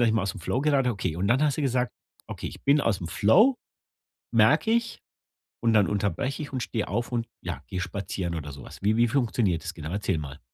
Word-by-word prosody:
dass 120 - +4
ich 110 - +2
mal 110 - +2
ausm 100 +1 -3
Flow 120 +9 -1
gerate.” 140 -4 +3
Okay, 95 -7 -2
und 95 +3 0
dann 130 +5 +3
hast 150 -1 +1
du - - 0
gesagt: 125 -2 0 0.3
„Okay, - - -6
ich - - -9
bin 145 +2 +5
ausm 95 -10 0
Flow, 215 - +4 0.8
merke 225 - +4
ich, 235 0 0 0.6
und 115 -1 +2
dann 105 -3 +5
unterbreche 105 - -1
ich 145 - -9
und 130 - -2
stehe 110 -3 -2
auf 120 +1 -2
und, 120 -2 -1 0.2
ja, - - -5
gehe 95 - -4
spazieren 90 -1 -3
oder 75 -3 -5
so 70 -1 -10
was.“ - - -11
Wie 105 +2 +3
wie 120 0 +4
funktioniert 110 - +1
das 85 - -5
genau? 80 -3 -7
Erzähl 95 -3 -1
mal. 70 -3 -7
110 Hz, 230 wpm, -26 LUFS, 95-130 Hz, 0.8 s, bin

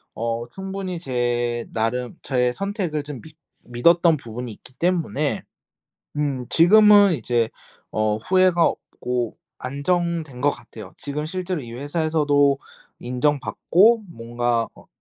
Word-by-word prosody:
어 115 +1 -2
충분히 190 -1 -5
제 120 -4 -1
나름 120 +2 -2
저의 125 -2 +1
선택을 190 - -2
좀 145 -4 -8
믿 160 -1 -15 0.3
믿었던 165 +7 +3
부분이 120 -2 -7
있기 125 - -15
때문에 165 -5 0 0.7
음 140 -4 -1
지금은 205 +3 +7
이제 120 -3 0 0.4
어 110 -1 +1
후회가 185 - +3
없고 125 -6 -2 0.2
안정된 155 0 -2
것 145 +2 +3
같아요. 115 -6 -10
지금 150 +1 -4
실제로 185 0 -3
이 120 -3 -9
회사에서도 145 0 +1 0.4
인정 125 +4 0
받고 220 - +3
뭔가 120 -1 -1
어 - - -17
145 Hz, 250 characters per minute, -23 LUFS, 120-170 Hz, 0.7 s, 지금은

